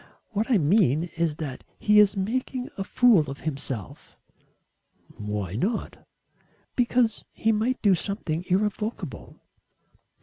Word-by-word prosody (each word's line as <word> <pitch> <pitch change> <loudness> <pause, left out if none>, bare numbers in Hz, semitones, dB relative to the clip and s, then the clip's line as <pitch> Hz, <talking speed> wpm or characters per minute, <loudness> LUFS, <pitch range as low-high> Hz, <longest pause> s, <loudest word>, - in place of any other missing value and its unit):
What 215 +3 -2
I 240 - +5
mean 160 - +3
is 165 -2 0
that 145 -5 -6
he 210 0 +4
is 205 -1 +5
making 250 +5 -2
a 195 - -3
fool 205 - +4
of 140 - -7
himself." 135 - -5 1.0
"Why 105 -3 -3
not?" 200 - -3 0.7
"Because 240 -2 +2
he 225 - +1
might 225 +4 0
do 200 -3 +6
something 175 -3 -2
irrevocable." 210 +4 -2
195 Hz, 115 wpm, -26 LUFS, 150-220 Hz, 1.0 s, do